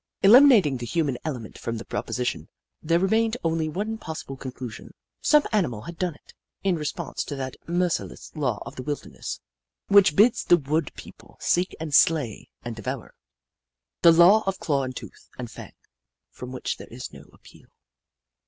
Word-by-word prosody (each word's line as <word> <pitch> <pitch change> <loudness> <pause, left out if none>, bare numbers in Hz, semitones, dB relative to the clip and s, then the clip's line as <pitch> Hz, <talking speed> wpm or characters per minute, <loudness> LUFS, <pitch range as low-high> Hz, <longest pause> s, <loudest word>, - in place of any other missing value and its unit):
Eliminating 210 - +7
the 120 - -6
human 145 -1 0
element 125 -8 -6
from 115 0 -4
the 110 - -7
proposition, 125 -1 -3 0.3
there 165 +2 +2
remained 220 +5 +2
only 160 -1 0
one 215 +7 -3
possible 155 -4 -7
conclusion. 130 -3 -8 0.3
Some 300 -1 +5
animal 155 - 0
had 170 +8 -9
done 180 -4 -1
it, - - -20 0.3
in 190 -2 +2
re 155 -2 -4
sponse - - -3
to 145 - -5
that 130 -1 -5
merciless 175 0 -2
law 130 -8 -1
of - - -9
the - - -4
wilderness, 145 +3 -5 0.5
which 200 -6 +6
bids 225 +4 +4
the 175 - +5
wood 150 +1 -1
people - - -13
seek 180 +2 +1
and 155 -2 -5
slay 140 -7 +3
and 120 -1 -5
devour; 110 -2 -6 0.9
the 170 - +8
law 175 +6 +7
of 195 - 0
claw 140 -3 0
and 130 -1 -4
tooth - - -11
and 120 -2 -6
fang, - - -10 0.6
from 125 0 -9
which 130 - -4
there - - -11
is - - -8
no - - -12
appeal. - - -19
160 Hz, 170 wpm, -25 LUFS, 130-185 Hz, 0.9 s, the